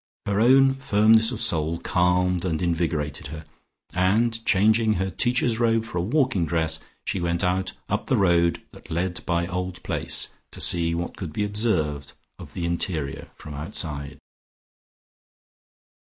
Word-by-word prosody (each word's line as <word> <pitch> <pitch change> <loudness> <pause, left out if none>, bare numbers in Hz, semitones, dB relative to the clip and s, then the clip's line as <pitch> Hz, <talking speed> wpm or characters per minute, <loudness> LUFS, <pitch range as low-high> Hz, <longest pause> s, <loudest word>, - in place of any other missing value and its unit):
Her 100 0 0
own 135 +3 +5
firmness 110 -4 +4
of 120 - -5
soul 80 0 +1
calmed 90 0 +1
and 80 -4 -1
invigorated 80 -5 -1
her, 80 +1 -9 0.5
and 110 +6 +1
changing 110 +2 +3
her 95 0 -2
Teacher's 120 +3 0
Robe 115 -1 +2
for 90 -6 -4
a - - +1
walking 125 - +1
dress, 80 0 0 0.3
she 95 - -2
went 85 +1 0
out 90 +1 0
up - - -2
the - - +2
road 85 -3 +2
that - - -15
led 85 +2 -2
by 85 -1 +1
Old 90 0 -5
Place, - - -1 0.2
to - - -7
see 85 -1 +3
what 85 +1 -4
could 90 -5 -6
be 105 - -2
observed 90 -10 -1 0.3
of - - -11
the 85 - -3
interior 85 -4 -2
from 75 - -10
outside. 70 -1 -3
90 Hz, 150 wpm, -24 LUFS, 85-110 Hz, 0.5 s, own